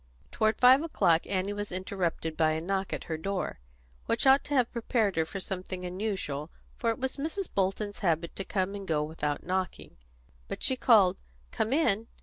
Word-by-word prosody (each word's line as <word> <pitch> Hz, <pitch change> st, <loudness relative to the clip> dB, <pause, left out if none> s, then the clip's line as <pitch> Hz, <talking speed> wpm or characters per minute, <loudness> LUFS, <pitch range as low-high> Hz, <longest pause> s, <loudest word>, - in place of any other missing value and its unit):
Toward 220 Hz, 0 st, +1 dB
five 255 Hz, +3 st, +7 dB
o'clock 170 Hz, -, +2 dB
Annie 195 Hz, +1 st, -1 dB
was 205 Hz, 0 st, -4 dB
interrupted 180 Hz, -3 st, -2 dB
by 155 Hz, -1 st, +3 dB
a 160 Hz, -, -1 dB
knock 190 Hz, +3 st, -2 dB
at -, -, -3 dB
her 160 Hz, -, -3 dB
door, 190 Hz, -, -3 dB, 0.5 s
which 230 Hz, -, +1 dB
ought 270 Hz, +1 st, +6 dB
to 290 Hz, -, -2 dB
have 250 Hz, -3 st, +3 dB
prepared 225 Hz, -4 st, 0 dB
her 160 Hz, 0 st, +2 dB
for 195 Hz, -, -6 dB
something 185 Hz, -1 st, -5 dB
unusual, 180 Hz, -6 st, -3 dB, 0.3 s
for 230 Hz, -, 0 dB
it 225 Hz, -, 0 dB
was 265 Hz, 0 st, -3 dB
Mrs. 325 Hz, +6 st, -2 dB
Bolton's 200 Hz, +2 st, -1 dB
habit 170 Hz, -3 st, 0 dB
to 195 Hz, -, -4 dB
come 190 Hz, 0 st, -1 dB
and 200 Hz, -1 st, -6 dB
go 150 Hz, -2 st, +1 dB
without 150 Hz, -1 st, -3 dB
knocking. 185 Hz, -, -3 dB, 0.5 s
But -, -, -6 dB
she 260 Hz, -, +2 dB
called 215 Hz, -8 st, +5 dB, 0.3 s
"Come 220 Hz, -, -1 dB
in!" 230 Hz, -7 st, +2 dB
195 Hz, 185 wpm, -29 LUFS, 175-225 Hz, 0.5 s, five